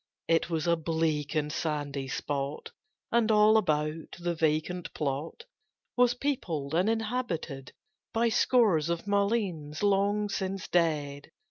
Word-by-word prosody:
It 165 Hz, +1 st, +2 dB
was 160 Hz, -1 st, -1 dB
a 170 Hz, -1 st, +3 dB
bleak 160 Hz, -2 st, -1 dB
and 150 Hz, -1 st, 0 dB
sandy 145 Hz, -3 st, -2 dB
spot, 140 Hz, +2 st, -3 dB, 0.4 s
And, 235 Hz, -1 st, +3 dB
all 215 Hz, 0 st, +6 dB
about, 155 Hz, -5 st, 0 dB
the 175 Hz, 0 st, -2 dB
vacant 160 Hz, +2 st, -1 dB
plot 150 Hz, -, -3 dB, 0.5 s
Was 245 Hz, -1 st, +4 dB
peopled 170 Hz, -, -2 dB
and 180 Hz, +6 st, +2 dB
inhabited 220 Hz, -, -3 dB, 0.4 s
By 230 Hz, +1 st, +2 dB
scores 215 Hz, -, +3 dB
of 170 Hz, +2 st, -2 dB
mulleins 200 Hz, -7 st, -1 dB
long 205 Hz, +1 st, +2 dB
since 195 Hz, -2 st, -3 dB
dead. 150 Hz, -5 st, 0 dB
170 Hz, 125 wpm, -29 LUFS, 150-210 Hz, 0.5 s, all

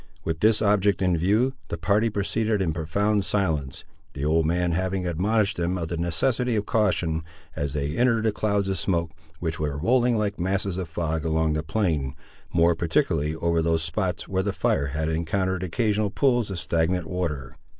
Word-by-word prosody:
With 80 Hz, 0 st, -2 dB
this 110 Hz, +2 st, +3 dB
object 100 Hz, -1 st, +2 dB
in 90 Hz, -1 st, +3 dB
view, 105 Hz, +10 st, +2 dB
the 85 Hz, -, -4 dB
party 100 Hz, +8 st, +2 dB
proceeded 105 Hz, +1 st, 0 dB
in 85 Hz, -5 st, 0 dB
profound 100 Hz, +6 st, 0 dB
silence, 80 Hz, -10 st, -1 dB, 0.3 s
the 70 Hz, 0 st, -4 dB
old 80 Hz, +1 st, +2 dB
man 90 Hz, +1 st, +1 dB
having 95 Hz, +2 st, -1 dB
admonished 100 Hz, +5 st, +1 dB
them 85 Hz, +2 st, 0 dB
of 85 Hz, -2 st, -3 dB
the 85 Hz, -, -2 dB
necessity 115 Hz, +9 st, +1 dB
of 105 Hz, -1 st, 0 dB
caution, 90 Hz, -7 st, +1 dB, 0.3 s
as 70 Hz, -1 st, -2 dB
they 75 Hz, +1 st, -2 dB
entered 120 Hz, -2 st, +2 dB
the 110 Hz, -, +2 dB
clouds 100 Hz, -1 st, 0 dB
of 95 Hz, -2 st, -1 dB
smoke, 85 Hz, -2 st, 0 dB, 0.3 s
which 80 Hz, -1 st, -3 dB
were 75 Hz, -2 st, -2 dB
rolling 120 Hz, -, +2 dB
like 105 Hz, -2 st, -1 dB
masses 95 Hz, +1 st, -1 dB
of 90 Hz, -3 st, -4 dB
fog 80 Hz, -1 st, -2 dB
along 80 Hz, -1 st, +1 dB
the 75 Hz, -, 0 dB
plain, 80 Hz, -7 st, -1 dB, 0.4 s
more 85 Hz, 0 st, +4 dB
particularly 80 Hz, -, 0 dB
over 85 Hz, 0 st, +1 dB
those 80 Hz, 0 st, +1 dB
spots 85 Hz, +3 st, -2 dB
where 95 Hz, -1 st, 0 dB
the 100 Hz, 0 st, -2 dB
fire 70 Hz, -, +1 dB
had 75 Hz, +3 st, -2 dB
encountered 90 Hz, +3 st, -1 dB
occasional 105 Hz, +3 st, 0 dB
pools 120 Hz, -1 st, +2 dB
of 95 Hz, -, -4 dB
stagnant 85 Hz, +1 st, 0 dB
water. 80 Hz, -8 st, -3 dB
90 Hz, 180 wpm, -25 LUFS, 80-105 Hz, 0.4 s, more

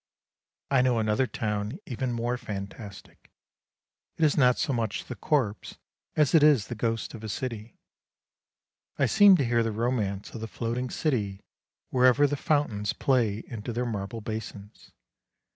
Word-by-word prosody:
I 135 Hz, -2 st, +5 dB
know 125 Hz, -2 st, +2 dB
another 110 Hz, +3 st, +1 dB
town 105 Hz, +4 st, -3 dB
even 125 Hz, -1 st, -3 dB
more 120 Hz, +1 st, -1 dB
fantastic; 100 Hz, -2 st, -8 dB, 0.9 s
it 160 Hz, -, +3 dB
is 150 Hz, -, +3 dB
not 125 Hz, -3 st, +4 dB
so 140 Hz, -, 0 dB
much 115 Hz, -4 st, -2 dB
the 125 Hz, -, -7 dB
corpse 115 Hz, -3 st, -1 dB, 0.4 s
as 150 Hz, -3 st, +3 dB
it 160 Hz, -, +7 dB
is 145 Hz, -8 st, +4 dB
the -, -, -3 dB
ghost 115 Hz, 0 st, -2 dB
of 115 Hz, -, -9 dB
a 110 Hz, -, -5 dB
city. 115 Hz, -3 st, -5 dB, 1.2 s
I -, -, +3 dB
seem 205 Hz, -3 st, +7 dB
to 140 Hz, -, +1 dB
hear 120 Hz, 0 st, +2 dB
the 115 Hz, -1 st, 0 dB
romance 105 Hz, -3 st, -2 dB
of 115 Hz, -, -8 dB
the 115 Hz, -, -4 dB
floating 120 Hz, +3 st, -3 dB
city 105 Hz, -12 st, -1 dB, 0.5 s
wherever 130 Hz, +2 st, +5 dB
the 145 Hz, 0 st, 0 dB
fountains 135 Hz, -9 st, 0 dB
play 115 Hz, -6 st, +1 dB
into 115 Hz, 0 st, -6 dB
their 120 Hz, +2 st, -2 dB
marble 110 Hz, 0 st, -4 dB
basins. 105 Hz, -1 st, -8 dB
115 Hz, 155 wpm, -27 LUFS, 105-130 Hz, 1.2 s, it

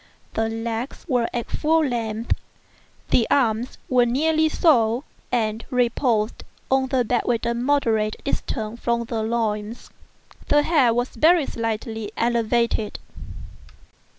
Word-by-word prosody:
The 225 Hz, 0 st, 0 dB
legs 225 Hz, +2 st, -4 dB
were 245 Hz, -6 st, +1 dB
at 240 Hz, -1 st, -4 dB
full 320 Hz, 0 st, +2 dB
length; 230 Hz, -3 st, -1 dB, 0.8 s
the 235 Hz, -, +4 dB
arms 240 Hz, -2 st, +1 dB
were 250 Hz, -1 st, +4 dB
nearly 315 Hz, +5 st, +2 dB
so, 245 Hz, -7 st, +3 dB, 0.3 s
and 220 Hz, -2 st, 0 dB
reposed 240 Hz, -3 st, 0 dB, 0.3 s
on 265 Hz, 0 st, +3 dB
the 255 Hz, -2 st, +1 dB
bed 240 Hz, +1 st, +1 dB
at 235 Hz, -2 st, 0 dB
a 235 Hz, -, +1 dB
moderate 235 Hz, -4 st, +1 dB
distance 225 Hz, -4 st, -3 dB
from 235 Hz, 0 st, 0 dB
the 230 Hz, -1 st, -3 dB
loin. 220 Hz, -1 st, -1 dB, 0.7 s
The 295 Hz, 0 st, +4 dB
head 270 Hz, -9 st, +3 dB
was 245 Hz, +1 st, 0 dB
very 330 Hz, -1 st, +4 dB
slightly 225 Hz, -2 st, -4 dB
elevated. 235 Hz, -2 st, +1 dB
235 Hz, 125 wpm, -23 LUFS, 225-260 Hz, 0.8 s, the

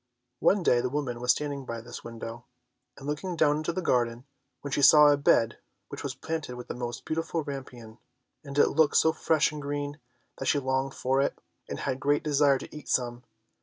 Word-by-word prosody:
One 195 Hz, -2 st, +3 dB
day 120 Hz, -6 st, +4 dB
the 125 Hz, -, -1 dB
woman 125 Hz, -4 st, -3 dB
was 125 Hz, -, +4 dB
standing 145 Hz, -2 st, -2 dB
by 115 Hz, -2 st, -5 dB
this 120 Hz, +1 st, -9 dB
window 115 Hz, 0 st, -8 dB, 0.5 s
and 135 Hz, -, -11 dB
looking 155 Hz, +5 st, -3 dB
down 150 Hz, -2 st, +3 dB
into 155 Hz, +2 st, -2 dB
the 185 Hz, +1 st, -3 dB
garden, 120 Hz, -3 st, 0 dB, 0.4 s
when 140 Hz, -, -6 dB
she 145 Hz, -, 0 dB
saw 150 Hz, +2 st, +8 dB
a 145 Hz, -, +5 dB
bed 115 Hz, -5 st, +2 dB, 0.3 s
which -, -, -7 dB
was -, -, -4 dB
planted 160 Hz, -6 st, -4 dB
with 125 Hz, 0 st, -9 dB
the -, -, -2 dB
most 120 Hz, -1 st, -5 dB
beautiful 165 Hz, 0 st, -2 dB
rampion 135 Hz, -3 st, -7 dB
(rapunzel), 110 Hz, -1 st, -14 dB, 0.4 s
and 140 Hz, 0 st, -7 dB
it -, -, +5 dB
looked 150 Hz, -, +3 dB
so 160 Hz, -, +4 dB
fresh 160 Hz, -2 st, +2 dB
and 150 Hz, -1 st, -7 dB
green 145 Hz, +1 st, -4 dB, 0.4 s
that 135 Hz, -, -3 dB
she -, -, +3 dB
longed 135 Hz, 0 st, -1 dB
for 135 Hz, +1 st, +1 dB
it, 140 Hz, -, -1 dB, 0.3 s
and -, -, -5 dB
had 130 Hz, -2 st, -1 dB
the -, -, -18 dB
greatest 145 Hz, +2 st, +1 dB
desire 145 Hz, -2 st, +3 dB
to -, -, -10 dB
eat 150 Hz, -, -10 dB
some. 120 Hz, -1 st, 0 dB
140 Hz, 215 wpm, -28 LUFS, 125-150 Hz, 0.5 s, saw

